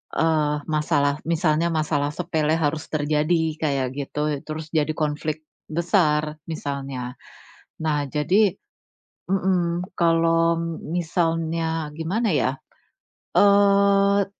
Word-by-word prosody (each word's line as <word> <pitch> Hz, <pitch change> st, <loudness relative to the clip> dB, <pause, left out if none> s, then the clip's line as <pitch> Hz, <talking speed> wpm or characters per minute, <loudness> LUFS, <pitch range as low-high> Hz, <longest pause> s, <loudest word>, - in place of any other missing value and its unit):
eee, 150 Hz, -2 st, +1 dB
masalah, 150 Hz, -2 st, +1 dB
misalnya 165 Hz, -1 st, +2 dB
masalah 150 Hz, -3 st, -1 dB
sepele 160 Hz, -3 st, 0 dB
harus 155 Hz, -1 st, -1 dB
terjadi, 155 Hz, +1 st, 0 dB
kayak 140 Hz, -4 st, 0 dB
gitu. 145 Hz, +1 st, -2 dB
Terus 155 Hz, 0 st, -6 dB
jadi 155 Hz, -1 st, +1 dB
konflik 155 Hz, 0 st, -2 dB, 0.2 s
besar, 155 Hz, -3 st, +1 dB
misalnya. 140 Hz, -5 st, -5 dB, 0.7 s
Nah, 145 Hz, -2 st, 0 dB
jadi 180 Hz, +9 st, +3 dB, 0.8 s
mhm, 180 Hz, -2 st, +1 dB, 0.2 s
kalau 165 Hz, 0 st, +3 dB
m 165 Hz, -1 st, -4 dB, 0.2 s
misalnya, 165 Hz, -2 st, -1 dB
gimana 180 Hz, +8 st, -1 dB
ya, 135 Hz, -3 st, +1 dB, 0.8 s
eee, 200 Hz, 0 st, +5 dB
160 Hz, 95 wpm, -23 LUFS, 150-170 Hz, 0.8 s, eee